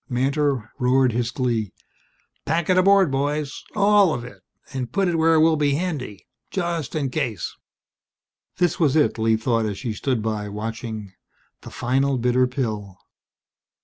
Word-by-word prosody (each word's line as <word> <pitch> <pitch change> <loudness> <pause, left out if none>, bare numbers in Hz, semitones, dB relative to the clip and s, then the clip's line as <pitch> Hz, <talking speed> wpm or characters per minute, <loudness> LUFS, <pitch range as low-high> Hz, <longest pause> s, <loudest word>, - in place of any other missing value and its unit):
Mantor 135 -2 0
roared 130 0 +3
his 120 +1 -1
glee. 120 -5 -2 0.7
"Pack 165 +3 0
it 185 - +3
aboard, 195 -3 +5
boys 145 +1 -2
all 200 -4 +4
of 120 - -5
it! 125 - -11 0.3
And 125 -3 -4
put 195 +7 +1
it 175 - 0
where 165 0 +4
it 155 - +5
will 160 0 +4
be 145 -1 +2
handy, 145 - -4 0.2
just 170 -7 -3
in 140 -4 -1
case." 125 - -3 1.0
This 175 -3 +1
was 150 -4 +3
it, 150 -6 +2
Lee 110 0 +3
thought 115 -1 0
as 100 -2 -4
she 115 -1 -4
stood 120 0 -1
by, 105 -2 -2
watching 110 -1 -6 0.5
the - - -10
final 135 +2 0
bitter 125 +1 +2
pill. 110 -7 -4
130 Hz, 155 wpm, -23 LUFS, 115-155 Hz, 1.0 s, aboard